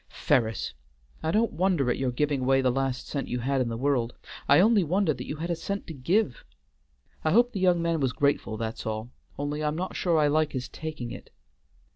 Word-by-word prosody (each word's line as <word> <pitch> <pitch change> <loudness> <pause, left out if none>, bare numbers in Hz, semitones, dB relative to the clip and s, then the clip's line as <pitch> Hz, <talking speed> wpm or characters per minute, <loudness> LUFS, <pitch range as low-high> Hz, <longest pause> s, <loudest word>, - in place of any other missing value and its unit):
Ferris! 110 - 0 0.5
I 160 - -1
don't 220 +7 +2
wonder 170 -7 +2
at - - -2
your 130 -1 +1
giving 140 +2 0
away 135 +1 +3
the 130 -1 +2
last 130 0 -2
cent 140 - -3
you 125 - -2
had 135 +2 0
in 120 - 0
the 115 - -3
world, 125 -2 0 0.3
I 140 - +7
only 210 +1 +5
wonder 180 0 +1
that 125 -1 -8
you - - -3
had 165 +3 -3
a - - +1
cent 200 +4 -4
to 165 - -7
give. 160 - 0 0.8
I 155 - +2
hope 240 +8 +4
the 205 - -4
young 180 -2 +3
man 165 -1 +1
was 135 -3 +1
grateful, 140 -5 0
that's 110 0 -4
all, 110 +2 -4 0.3
only 145 +2 -2
I'm 150 0 0
not 185 +3 -4
sure 170 -3 +1
I 150 - +4
like 150 +1 +2
his 130 -1 -3
taking 155 -7 -6
it." - - -9
145 Hz, 220 wpm, -27 LUFS, 125-170 Hz, 0.8 s, I